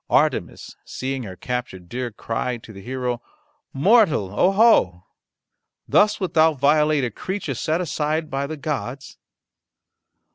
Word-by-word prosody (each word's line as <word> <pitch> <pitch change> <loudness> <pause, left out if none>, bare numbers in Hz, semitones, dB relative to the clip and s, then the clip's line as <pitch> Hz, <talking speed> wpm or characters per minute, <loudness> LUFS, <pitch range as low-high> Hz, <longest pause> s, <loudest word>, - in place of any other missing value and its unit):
Artemis - - 0
seeing 135 0 -4
her 95 -6 -7
captured 105 -5 -5
deer 125 +4 -4
cried 115 +2 -4
to 110 - -12
the 95 - -10
hero, 125 +1 -3 0.5
"Mortal, 160 - +3
oho! 180 - +3 0.8
thus 210 +1 +3
wilt 185 -3 -3
thou 160 -1 +4
violate 150 +1 +3
a 120 - -1
creature 185 - -4
set 155 +6 -1
aside 155 -1 -1
by 135 +1 -2
the 155 +1 -6
gods?" 140 -2 -5
135 Hz, 130 wpm, -22 LUFS, 120-160 Hz, 0.8 s, thou